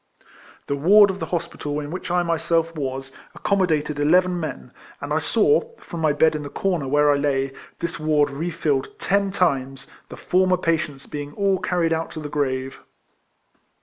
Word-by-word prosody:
The 140 Hz, -, -1 dB
waj*d 195 Hz, +7 st, +6 dB
of 190 Hz, -, -9 dB
the -, -, -4 dB
hospital 150 Hz, -4 st, -3 dB
in 145 Hz, 0 st, -6 dB
which 185 Hz, +1 st, -5 dB
I 175 Hz, 0 st, +2 dB
myself 165 Hz, 0 st, 0 dB
was, 135 Hz, -2 st, -4 dB
ac -, -, -18 dB
comodated 155 Hz, -7 st, +1 dB
eleven 180 Hz, +4 st, +3 dB
men, 160 Hz, -, -6 dB, 0.3 s
and -, -, -4 dB
I -, -, +2 dB
saw, 465 Hz, +1 st, +2 dB
from 170 Hz, -, -8 dB
my 155 Hz, -2 st, +2 dB
bed 155 Hz, +2 st, +3 dB
in 150 Hz, -, -3 dB
the 145 Hz, -, -6 dB
corner 175 Hz, -4 st, -1 dB
where 145 Hz, +2 st, +4 dB
I 145 Hz, -, +3 dB
lay, 135 Hz, -2 st, 0 dB, 0.2 s
this 170 Hz, 0 st, -4 dB
ward 150 Hz, -1 st, +2 dB
refilled 145 Hz, -2 st, -2 dB
ten 200 Hz, 0 st, +1 dB
times, 135 Hz, -8 st, -1 dB, 0.2 s
the -, -, -9 dB
former 185 Hz, 0 st, +2 dB
patients 155 Hz, -5 st, -1 dB
being 145 Hz, 0 st, -6 dB
all 195 Hz, 0 st, +1 dB
carried 175 Hz, -4 st, 0 dB
out 160 Hz, 0 st, -2 dB
to -, -, -6 dB
the 150 Hz, -1 st, -6 dB
grave. 135 Hz, -2 st, -2 dB
160 Hz, 180 wpm, -23 LUFS, 145-180 Hz, 0.3 s, waj*d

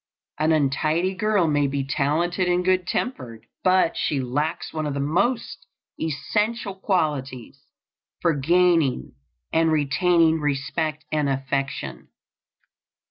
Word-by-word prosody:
An 155 Hz, +1 st, +2 dB
untidy 155 Hz, +5 st, +1 dB
girl 210 Hz, -1 st, +1 dB
may 145 Hz, -2 st, +2 dB
be 140 Hz, 0 st, -2 dB
talented 160 Hz, +6 st, 0 dB
and 180 Hz, 0 st, +1 dB
good 185 Hz, -1 st, +2 dB
tempered, 125 Hz, -, -4 dB, 0.2 s
but 185 Hz, -2 st, +3 dB
she 145 Hz, -, 0 dB
lacks 145 Hz, +6 st, -2 dB
one 155 Hz, -1 st, -2 dB
of 145 Hz, -, -3 dB
the -, -, -2 dB
most 200 Hz, -, -1 dB, 0.3 s
essential 200 Hz, +8 st, -1 dB
qualities 140 Hz, -, -2 dB, 0.5 s
for 170 Hz, -2 st, +2 dB
gaining 160 Hz, -, +2 dB, 0.4 s
and 165 Hz, 0 st, +3 dB
retaining 160 Hz, +2 st, +3 dB
respect 150 Hz, +2 st, -2 dB
and 150 Hz, -2 st, +1 dB
affection. 135 Hz, 0 st, -3 dB
155 Hz, 115 wpm, -24 LUFS, 140-180 Hz, 0.5 s, but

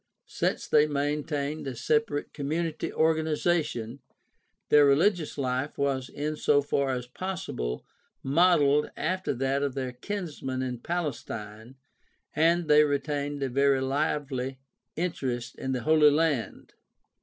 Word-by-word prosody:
Since -, -, -2 dB
they 150 Hz, -, +4 dB
maintained 145 Hz, 0 st, -2 dB
a 130 Hz, -, -4 dB
separate 150 Hz, +3 st, 0 dB
community 155 Hz, +3 st, -2 dB
organization, 155 Hz, -5 st, 0 dB, 0.7 s
their 150 Hz, 0 st, +7 dB
reHgious 160 Hz, +3 st, +2 dB
life 130 Hz, +1 st, -2 dB
was 135 Hz, -2 st, -1 dB
in 150 Hz, +2 st, -3 dB
so 145 Hz, -1 st, +3 dB
far 140 Hz, -1 st, 0 dB
as 125 Hz, -2 st, -2 dB
possible 125 Hz, -, -4 dB, 0.4 s
modeled 150 Hz, -1 st, +4 dB
after 185 Hz, +4 st, -1 dB
that 135 Hz, +2 st, 0 dB
of 140 Hz, -2 st, -1 dB
their 130 Hz, -2 st, -3 dB
kinsmen 135 Hz, -3 st, -4 dB
in 125 Hz, -2 st, -4 dB
Palestine 120 Hz, -7 st, -5 dB, 0.6 s
and 165 Hz, +1 st, +3 dB
they 150 Hz, 0 st, +7 dB
retained 145 Hz, 0 st, -2 dB
a 135 Hz, -, -1 dB
very 140 Hz, +1 st, +3 dB
lively 135 Hz, -1 st, -1 dB, 0.4 s
interest 125 Hz, -8 st, -3 dB
in 130 Hz, -, -3 dB
the 125 Hz, -2 st, -1 dB
Holy 155 Hz, -1 st, +6 dB
Land. 150 Hz, -4 st, -1 dB
145 Hz, 120 wpm, -28 LUFS, 130-155 Hz, 0.7 s, their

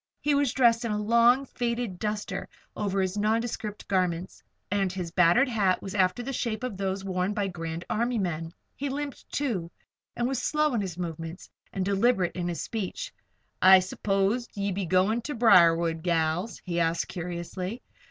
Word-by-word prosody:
He 295 Hz, -, +1 dB
was 280 Hz, -3 st, +2 dB
dressed 235 Hz, -3 st, +3 dB
in 235 Hz, -, -2 dB
a 210 Hz, -, 0 dB
long, 235 Hz, +5 st, +4 dB
faded 235 Hz, -7 st, -3 dB
"duster" 210 Hz, -1 st, -3 dB, 0.3 s
over 200 Hz, -2 st, -1 dB
his 185 Hz, 0 st, -1 dB
other 205 Hz, -, -1 dB
nondescript 220 Hz, -1 st, -2 dB
garments, 180 Hz, -2 st, -1 dB, 0.3 s
and 195 Hz, -2 st, +1 dB
his 180 Hz, -3 st, -5 dB
battered 180 Hz, +9 st, +4 dB
hat 205 Hz, -6 st, +1 dB
was 195 Hz, -, -6 dB
after 190 Hz, +3 st, +1 dB
the 270 Hz, +2 st, -4 dB
shape 230 Hz, -2 st, -2 dB
of 250 Hz, -5 st, -3 dB
those 195 Hz, 0 st, -3 dB
worn 185 Hz, +1 st, -1 dB
by 205 Hz, -2 st, 0 dB
Grand 165 Hz, -1 st, -5 dB
Army 235 Hz, +2 st, 0 dB
men. 165 Hz, -4 st, -2 dB, 0.2 s
He 280 Hz, +1 st, -3 dB
limped, 285 Hz, 0 st, -5 dB
too, 220 Hz, -13 st, -1 dB, 0.5 s
and 240 Hz, -, 0 dB
was 265 Hz, 0 st, -1 dB
slow 300 Hz, -2 st, +1 dB
in 230 Hz, -, +1 dB
his 185 Hz, -4 st, -5 dB
movements 165 Hz, 0 st, -6 dB, 0.2 s
and 190 Hz, -1 st, -2 dB
deliberate 200 Hz, -2 st, +2 dB
in 175 Hz, -1 st, -2 dB
his 175 Hz, -1 st, -3 dB
speech. 225 Hz, -, -4 dB, 0.5 s
"I 190 Hz, +1 st, +9 dB
s'pose 195 Hz, +5 st, 0 dB
ye 200 Hz, 0 st, -1 dB
be 190 Hz, -1 st, -2 dB
goin' 190 Hz, +7 st, +2 dB
ter 290 Hz, +5 st, -5 dB
Briarwood, 170 Hz, -7 st, +5 dB
gals?" 170 Hz, +3 st, 0 dB
he 175 Hz, -2 st, -1 dB
added, 165 Hz, 0 st, +1 dB
curiously. 180 Hz, +5 st, -5 dB
195 Hz, 175 wpm, -27 LUFS, 180-235 Hz, 0.5 s, I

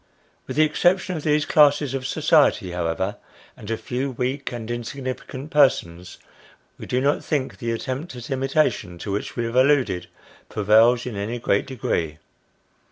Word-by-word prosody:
With 130 Hz, -, -5 dB
the 155 Hz, -, +6 dB
exception 180 Hz, +4 st, +2 dB
of 155 Hz, -, -4 dB
these 150 Hz, 0 st, +1 dB
classes 145 Hz, -2 st, +4 dB
of 130 Hz, -1 st, -3 dB
society, 145 Hz, -, +3 dB
however, 90 Hz, +3 st, -2 dB, 0.4 s
and 105 Hz, -, -11 dB
a 115 Hz, -, -1 dB
few 130 Hz, +4 st, -3 dB
weak 130 Hz, +2 st, -3 dB
and 120 Hz, -1 st, -5 dB
insignificant 130 Hz, +3 st, -6 dB
persons, 90 Hz, -, +2 dB, 0.6 s
we -, -, -8 dB
do 125 Hz, -, 0 dB
not 140 Hz, +2 st, +1 dB
think 140 Hz, -4 st, -2 dB
the 120 Hz, -3 st, -3 dB
attempt 130 Hz, +6 st, -4 dB
at 120 Hz, +2 st, -9 dB
imitation 130 Hz, -, 0 dB
to 100 Hz, -, -5 dB
which 100 Hz, -, -3 dB
we 120 Hz, -, -1 dB
have 115 Hz, +1 st, -4 dB
alluded, 130 Hz, -9 st, +3 dB, 0.4 s
prevails 110 Hz, +4 st, +4 dB
in 125 Hz, -4 st, -5 dB
any 105 Hz, +4 st, -3 dB
great 100 Hz, -4 st, 0 dB
degree. 85 Hz, -, -2 dB
125 Hz, 160 wpm, -23 LUFS, 110-140 Hz, 0.6 s, the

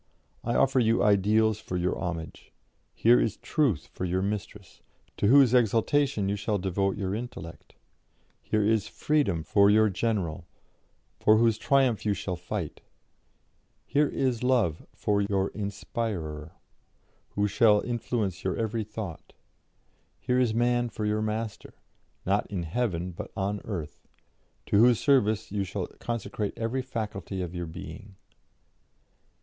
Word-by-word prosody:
I 120 Hz, -, -1 dB
offer 135 Hz, -1 st, +3 dB
you 115 Hz, -1 st, +3 dB
ideals 105 Hz, +1 st, +3 dB
for 90 Hz, -, -4 dB
your 90 Hz, +1 st, 0 dB
homage: 85 Hz, -3 st, -6 dB, 0.4 s
here 120 Hz, +2 st, +4 dB
is 110 Hz, -, -1 dB
Truth 135 Hz, -, 0 dB
for -, -, -5 dB
your 95 Hz, +1 st, 0 dB
Mistress, 100 Hz, -2 st, -5 dB, 0.4 s
to -, -, +2 dB
whose 130 Hz, 0 st, +6 dB
exaltation 115 Hz, -1 st, +2 dB
you 100 Hz, -, 0 dB
shall 105 Hz, +1 st, -1 dB
devote 95 Hz, +1 st, -1 dB
your 95 Hz, -2 st, -2 dB
intellect; 110 Hz, -7 st, -7 dB, 0.7 s
here 110 Hz, -1 st, 0 dB
is 110 Hz, 0 st, +2 dB
Freedom 115 Hz, -, 0 dB
for 100 Hz, +4 st, +4 dB
your 110 Hz, 0 st, +4 dB
General, 90 Hz, -6 st, -2 dB, 0.7 s
for 110 Hz, 0 st, +5 dB
whose 115 Hz, -1 st, +3 dB
triumph 135 Hz, -5 st, +2 dB
you 105 Hz, -1 st, +1 dB
shall 95 Hz, -2 st, -3 dB
fight; -, -, -5 dB, 1.0 s
here 150 Hz, +1 st, +2 dB
is 130 Hz, -4 st, -1 dB
Love 120 Hz, -11 st, +1 dB
for 100 Hz, -1 st, 0 dB
your 100 Hz, -1 st, 0 dB
Inspirer, 100 Hz, -6 st, -4 dB, 0.8 s
who 105 Hz, 0 st, +2 dB
shall 105 Hz, 0 st, +4 dB
influence 115 Hz, -6 st, -2 dB
your 95 Hz, -, -1 dB
every 110 Hz, 0 st, -1 dB
thought; 100 Hz, -5 st, -8 dB, 0.9 s
here 125 Hz, 0 st, +1 dB
is 125 Hz, -3 st, +2 dB
Man 120 Hz, +1 st, +1 dB
for 110 Hz, -, -4 dB
your 105 Hz, 0 st, 0 dB
Master 110 Hz, 0 st, -4 dB, 0.5 s
not 100 Hz, +2 st, +1 dB
in 95 Hz, -4 st, -3 dB
heaven, 90 Hz, -1 st, -2 dB
but 85 Hz, -, -7 dB
on 100 Hz, +1 st, -1 dB
earth 85 Hz, -10 st, -6 dB, 0.6 s
to 100 Hz, -, +2 dB
whose 120 Hz, 0 st, +5 dB
service 110 Hz, -8 st, +2 dB
you 100 Hz, -1 st, -1 dB
shall 95 Hz, -1 st, -3 dB
consecrate 115 Hz, -3 st, -3 dB
every 115 Hz, +3 st, -1 dB
faculty 105 Hz, -7 st, -4 dB
of 85 Hz, -1 st, -6 dB
your 85 Hz, -1 st, -4 dB
being. 95 Hz, +4 st, -9 dB
105 Hz, 140 wpm, -27 LUFS, 95-115 Hz, 1.0 s, whose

